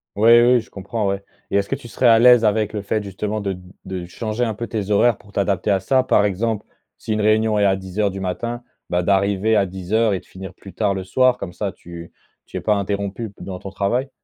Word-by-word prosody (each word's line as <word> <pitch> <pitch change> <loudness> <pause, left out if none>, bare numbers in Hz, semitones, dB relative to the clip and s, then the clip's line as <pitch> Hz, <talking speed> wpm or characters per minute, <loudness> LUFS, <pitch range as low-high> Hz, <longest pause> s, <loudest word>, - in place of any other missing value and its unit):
Ouais. 115 +3 +6
Oui, 125 - +5
oui, 120 - +3
je - - -18
comprends, 100 +2 -3
ouais 100 0 -2 0.3
et - - -2
est-ce 100 -1 0
que - - 0
tu 120 - -11
serais 125 +2 +1
à 115 -1 +6
l'aise 120 -1 +7
avec 105 0 +1
le 105 - -3
fait 105 +2 -1
justement 105 +2 -3
de 100 -2 -3 0.3
de 90 -2 -5
changer 110 +6 -3
un 110 - 0
peu 115 +3 -5
tes 105 -3 -4
horaires 110 +2 +4
pour 100 - -19
t'adapter 100 0 0
à 95 - +3
ça? 130 +7 +2
Par 105 -5 +3
exemple, 105 +2 -1 0.3
si 110 - -3
une 105 - 0
réunion 110 0 +3
est 105 - +2
à 95 -1 +3
10:00 95 +2 -2
du 95 - -6
matin, 115 +6 -4 0.3
bah, 90 0 +1
d'arriver 100 +3 +2
à 100 -2 +3
10:00 100 +4 0
et 95 - -1
de - - -22
finir 95 0 -10
plus 95 +1 -13
tard 105 -3 0
le 95 - -4
soir. 130 +5 +3
Comme 90 -6 -7
ça 100 0 -3
tu 85 -2 -11 0.3
tu - - -7
es - - -4
pas 105 - +2
interrompu 100 +2 -3
p - - -20
dans 95 -2 -6
ton 100 - -7
travail? 110 +7 -1
100 Hz, 255 wpm, -21 LUFS, 95-110 Hz, 0.3 s, l'aise